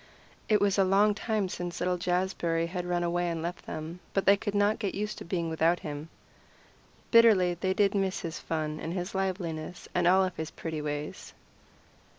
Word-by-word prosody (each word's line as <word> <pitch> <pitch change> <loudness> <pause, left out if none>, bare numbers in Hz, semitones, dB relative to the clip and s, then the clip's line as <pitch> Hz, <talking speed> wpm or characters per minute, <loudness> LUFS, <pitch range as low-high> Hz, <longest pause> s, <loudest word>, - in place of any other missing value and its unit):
It 210 -1 +5
was 200 0 +2
a - - +6
long 200 +3 +4
time 215 -1 -1
since 175 -1 -5
little 180 0 0
Jazbury 175 -2 0
had 180 +1 -4
run 175 0 0
away 175 0 0
and 165 -1 -3
left 175 +1 -5
them, 155 +3 -6 0.2
but 195 - +1
they 200 - +7
could 205 0 -4
not 205 +2 +2
get 200 -4 -2
used 210 +1 -3
to - - -7
being 170 -1 -1
without 165 +2 +2
him. 150 +1 -6 1.0
Bitterly 215 -7 +6
did 190 +2 -2
they 205 -1 +5
miss 195 -1 0
his 165 -1 -5
fun 155 -1 -3
and 165 - -4
his 180 +1 -3
liveliness 180 -4 -3
and 175 -1 +2
all 190 +1 +5
his 160 0 -4
pretty 160 -2 -5
ways. 150 0 -5
180 Hz, 185 wpm, -29 LUFS, 165-195 Hz, 1.0 s, they